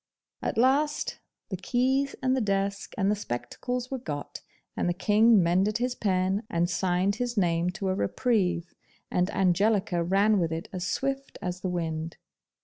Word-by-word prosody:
At - - -2
last 280 +5 +2 0.3
the 190 - -3
keys 260 +8 +1
and 260 0 +3
the 260 - +1
desk 200 -1 -1
and 195 -1 +2
the - - +2
spectacles 245 - -4
were 265 - -2
got, 145 - -6 0.3
and - - 0
the 175 - 0
King 210 +1 +5
mended 190 +5 +2
his 245 +1 -1
pen, 190 -3 0
and 170 +1 +1
signed 185 +3 +1
his 245 -1 -2
name 170 -2 +2
to 195 0 -3
a 185 - +2
reprieve, 185 -5 0 0.4
and 180 +2 +1
Angelica 190 0 +2
ran 200 +4 +3
with 165 -2 0
it 165 +1 -4
as 185 -1 -3
swift 275 +4 -2
as 180 0 -4
the 185 - -2
wind. 165 -2 -3
195 Hz, 165 wpm, -27 LUFS, 175-235 Hz, 0.4 s, King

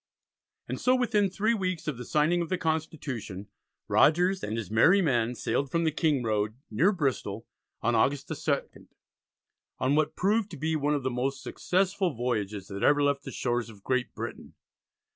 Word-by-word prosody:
And - - -4
so, 255 0 +4
within 215 -6 +2
three 215 +5 +1
weeks 185 -7 -2
of 150 -5 -2
the 125 - -6
signing 155 +6 +2
of 170 - -3
the 185 - 0
Constitution, 145 - -3 0.4
Rogers 180 +4 +4
and 110 +2 -2
his 105 -5 -5
merry 165 - +5
men 125 -8 +1
sailed 140 +3 -1
from 170 +4 0
the 160 - +2
King 150 -4 +1
Road, 110 -1 0 0.2
near 160 - +3
Bristol, 125 - -2 0.4
on 120 - +2
August 140 +4 +2
the 160 - -3
2nd, 145 -1 -3 0.9
on 130 +2 +1
what 155 +1 +1
proved 210 +2 +1
to 165 - -8
be 160 +3 -1
one 150 0 +1
of 140 - -2
the 130 - -1
most 130 +3 -2
successful 185 -3 0
voyages 105 -5 -2
that 100 0 -6
ever 145 0 +4
left 140 0 +1
the - - -5
shores 120 -2 -1
of 100 -3 -14
Great 130 -1 -1
Britain. - - -7
145 Hz, 180 wpm, -28 LUFS, 120-175 Hz, 0.9 s, merry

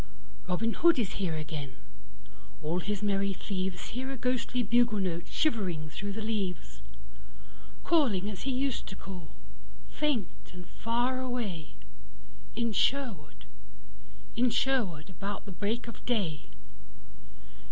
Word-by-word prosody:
Robin 225 +6 +2
Hood 340 -1 +6
is 215 -6 +1
here 170 -4 +1
again: 150 -4 -4 0.9
all 165 +4 +1
his 205 +2 -2
merry 200 -1 +2
thievesHear 190 +8 -2
a 270 - -3
ghostly 250 0 +1
bugle 235 0 +4
note 175 -3 -1
shivering 185 - +1
through 200 +5 -3
the 220 +2 -4
leaves, 195 -6 -2 1.0
Calling 240 - +4
as 200 -4 -4
he 275 - -1
used 265 0 0
to 190 - -6
call, 185 -4 -7 0.6
faint 245 - -1
and 180 -1 -9
far 240 +6 +1
away, 225 -11 -2 0.8
In 235 -1 +1
Sherwood, 190 - +1 0.9
in 245 +2 +4
Sherwood, 205 - +1
about 195 +3 -4
the 200 - -7
break 205 +7 -1
of 235 - -8
day. 180 -11 0
205 Hz, 120 wpm, -31 LUFS, 180-240 Hz, 1.0 s, Hood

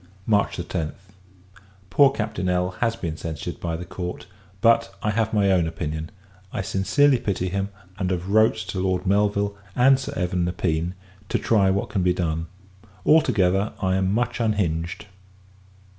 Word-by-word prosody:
March 105 -3 +2
10th. 85 -3 -3 1.0
Poor 140 +5 +6
Captain 105 -7 -2
L. 90 0 +1
has 115 -1 +1
been 85 -8 -4
censured 80 -2 -5
by 85 -1 -2
the 90 - -7
court: 90 -1 -6 0.3
but, 115 0 +4
I 105 - +1
have 110 +1 0
my 100 -3 +3
own 90 -3 +3
opinion. 80 -1 -4 0.4
I 110 -6 -3
sincerely 120 +9 +3
pity 95 -5 -1
him; 100 +2 -2 0.3
and 95 -2 0
have 90 0 -2
wrote 110 +2 +4
to 95 - -3
Lord 95 0 0
Melville, 100 +1 +1 0.2
and 135 +2 +5
Sir - - -5
Evan 90 -1 0
Nepean, 85 0 -1 0.3
to - - +1
try 100 -4 +3
what 100 +1 0
can 95 - -1
be 90 0 +3
done. 80 -2 -2 0.6
All 160 +1 +6
together, 95 - +1
I 95 -1 +1
am 95 0 +1
much 120 +4 0
unhinged. 85 -7 -1
95 Hz, 160 wpm, -24 LUFS, 90-105 Hz, 1.0 s, Poor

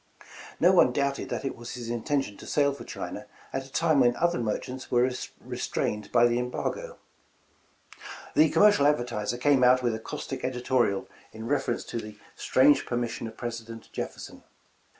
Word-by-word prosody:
No 175 +3 +6
one 175 -9 +5
doubted 140 +1 -1
that - - -3
it 135 - -2
was 120 +1 -8
his 120 -2 -6
intention 120 -1 -1
to - - -11
sail 140 -1 +2
for 140 - -9
China - - -7 0.3
at 135 0 -3
a - - -19
time 160 -2 +2
when 120 -2 +4
other 175 -5 +1
merchants 125 +3 -4
were 125 +1 +3 0.3
restrained 105 -1 -3
by 120 0 +5
the 120 0 +2
embargo. 470 - -4 1.4
"The 155 +1 +5
'Commercial 205 -8 +5
Advertiser' 120 -5 0
came 135 0 +3
out 125 +1 +5
with 120 -2 +1
a 110 - -3
caustic 130 +3 -6
editorial 125 -5 0 0.3
in 110 0 -8
reference 135 +2 0
to 120 - -5
the 105 -1 -9 0.2
'strange 135 +1 +4
permission 120 -1 -2
of 110 - -11
President 115 -1 -7
Jefferson.' - - -6
125 Hz, 165 wpm, -27 LUFS, 120-140 Hz, 1.4 s, No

